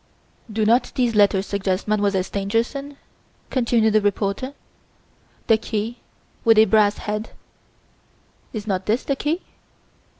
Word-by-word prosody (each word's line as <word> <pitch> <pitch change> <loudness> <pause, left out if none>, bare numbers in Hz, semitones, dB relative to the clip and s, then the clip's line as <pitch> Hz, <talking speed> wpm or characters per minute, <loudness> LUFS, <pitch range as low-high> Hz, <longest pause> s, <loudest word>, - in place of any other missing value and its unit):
Do 215 0 0
not 235 +4 +3
these 245 -3 +1
letters 200 -2 +3
suggest 195 -1 -2
Mademoiselle 205 -3 +1
Stangerson?" 230 +9 -2 0.5
continued 235 -4 +2
the 215 - +4
reporter. 205 +6 -1 0.9
"The 225 - +4
'key 225 +1 -3 0.4
with 225 -2 +5
a 220 - +8
brass 210 -2 +3
head' 210 +1 -4 1.2
is 215 -3 -5
not 190 -3 -2
this 225 +4 +1
the 275 - -1
key? 305 +6 -2
215 Hz, 125 wpm, -22 LUFS, 205-235 Hz, 1.2 s, a